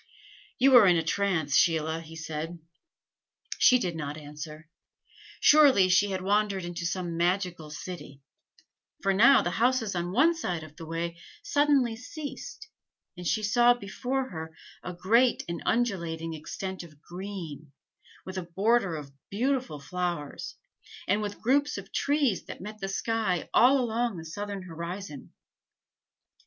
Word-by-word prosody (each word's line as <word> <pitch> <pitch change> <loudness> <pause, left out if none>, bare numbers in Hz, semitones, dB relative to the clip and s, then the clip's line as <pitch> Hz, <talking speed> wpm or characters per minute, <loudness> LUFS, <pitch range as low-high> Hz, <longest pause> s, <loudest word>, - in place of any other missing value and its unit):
"You 265 +1 +5
are 215 -5 +8
in 180 - +5
a 165 - 0
trance, 165 -5 0
Sheila," 160 -1 +2
he 165 0 -12
said. 160 +1 -5 1.0
She 255 - +7
did 180 -8 -2
not 150 -2 -5
answer. 150 +1 -9 0.7
Surely 275 -11 +6
she 190 +3 +4
had 190 -1 -3
wandered 200 -1 +1
into 170 -1 -3
some 175 -1 -3
magical 175 -2 0
city, 150 -3 -8 0.8
for 195 0 +3
now 235 +7 +6
the 175 - -1
houses 235 0 +1
on 175 0 -2
one 290 - +4
side 180 - -3
of 155 -1 -12
the 165 0 -9
way 170 +1 -4 0.2
suddenly 285 - +2
ceased, 300 - -8 0.5
and 180 -1 -6
she 215 - 0
saw 240 +3 +5
before 250 +5 -3
her 160 -1 -7 0.2
a 180 - -6
great 230 +8 +3
and 170 0 -4
undulating 170 -8 -1
extent 190 +4 -6
of 155 -4 -14
green, 175 -6 -7 0.5
with 185 0 -5
a 175 -2 -8
border 205 -3 +2
of 145 -3 -8 0.2
beautiful 250 - -1
flowers, 170 0 -4 0.5
and 205 +3 +2
with 205 -1 -5
groups 285 +3 +2
of 200 +1 -9
trees 280 -8 +1
that - - -8
met 215 +2 -8
the 195 -1 -4
sky 205 -3 -1
all 265 +3 +6
along 235 -3 -1
the 165 - -8
southern 200 +4 -5
horizon. 170 -2 -7
185 Hz, 145 wpm, -28 LUFS, 165-230 Hz, 1.0 s, are